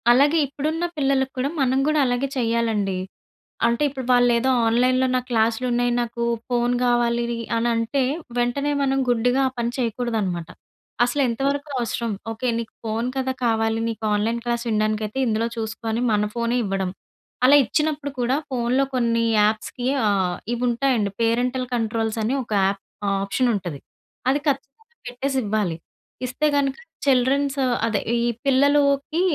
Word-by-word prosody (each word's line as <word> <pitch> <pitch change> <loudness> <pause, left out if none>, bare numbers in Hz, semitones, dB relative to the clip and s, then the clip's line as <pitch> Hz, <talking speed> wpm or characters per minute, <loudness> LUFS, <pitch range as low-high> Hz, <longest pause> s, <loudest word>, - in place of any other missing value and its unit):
అలాగే 285 +6 +4
ఇప్పుడున్న 305 +5 -3
పిల్లలకి 270 -2 +1
కూడా 260 +2 0
మనం 260 0 +2
కూడా 305 0 +2
అలాగే 245 +2 0
చేయాలండి. 225 -5 0 0.7
అంటే 235 +4 +1
ఇప్పుడు 265 -2 -6
వాళ్ళేదో 245 +1 +3 0.2
ఆన్‌లైన్‌లో 255 +3 +3
నాకు 250 0 -1
క్లాసులున్నాయి 240 +2 +1
నాకు 235 0 -4 0.3
ఫోను 245 0 +1
కావాలి 240 -1 +2 0.3
అని 230 +1 +1
అంటే 230 +5 0 0.4
వెంటనే 245 +4 0
మనం 270 0 +1
గుడ్డిగా 245 +2 +2
ఆ - - -16
పని 235 0 -1
చేయకూడదనమాట. 220 -8 -2 0.6
అసలెంతవరకు 275 +3 0
అవసరం? 235 -1 -2 0.2
ఓకే. 225 +3 -3
నీకు 230 -1 -6
ఫోను 225 +3 -1
కదా! 260 0 0
కావాలి 225 -1 +1
నీకు 225 -1 -6
ఆన్‌లైన్ 225 +3 0
క్లాస్ 235 0 -1
వినడానికైతే 215 +2 0
ఇందులో 225 0 +1
చూసుకొ 225 0 -5
అని 225 +2 -1
మన 210 -1 +2
ఫోనే 235 +1 0
ఇవ్వడం. 195 -1 -1 0.6
అలా 275 +3 +7
ఇచ్చినప్పుడు 300 +3 -1
కూడా 245 +2 +1 0.2
ఫోనులో 250 +2 +1
కొన్ని 230 -2 +1 0.2
యాప్స్‌కి 215 +4 0 0.2
ఆహ్, 190 -3 +1 0.2
ఇవుంటాయండి 240 -3 +1
పేరెంటల్ 245 +3 +1
కంట్రోల్స్ 225 -1 -1
అని 225 +5 0
ఒక 230 - -18
యాప్ 195 0 -1 0.4
ఆప్షన్ 240 +6 0
ఉంటది. 175 -7 -5 0.5
అది 275 +2 +2
ఖచ్చితంగా 285 - -3
పెట్టేసివ్వాలి. 230 -8 -1 0.5
ఇస్తే 255 +5 0
గనుక 275 -1 +1 0.3
చిల్డ్రన్స్ 275 +1 +2 0.3
అదే 220 -3 0 0.2
ఈ 235 0 +1 0.2
పిల్లలకి 280 +3 +3
240 Hz, 135 wpm, -23 LUFS, 225-265 Hz, 0.7 s, అలా